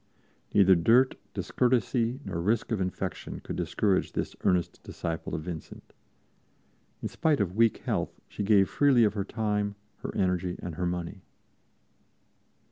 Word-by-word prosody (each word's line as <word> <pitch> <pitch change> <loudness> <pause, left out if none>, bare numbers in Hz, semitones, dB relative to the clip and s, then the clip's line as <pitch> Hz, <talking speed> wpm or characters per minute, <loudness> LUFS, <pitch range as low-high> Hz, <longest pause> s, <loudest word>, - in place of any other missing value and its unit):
Neither 95 -2 +7
dirt, 115 +10 +4 0.2
discourtesy 125 +1 +1
nor 85 -3 -3
risk 110 +6 0
of 105 -4 0
infection 90 -2 -4
could - - -6
discourage 100 -3 0
this - - -3
earnest 90 -2 +1
disciple 80 -1 -4
of 80 - -4
Vincent. 85 -1 -8 1.1
In - - 0
spite 155 -4 +1
of 95 -3 -1
weak 115 0 +3
health - - -2
she - - -6
gave 100 -1 +4
freely 140 -5 +4
of 105 -2 +3
her 100 -2 -1
time, 105 -1 -1 0.2
her - - -6
energy 90 -1 0
and 85 - -5
her 90 +2 -2
money. 90 +2 -4
100 Hz, 140 wpm, -28 LUFS, 90-115 Hz, 1.1 s, Neither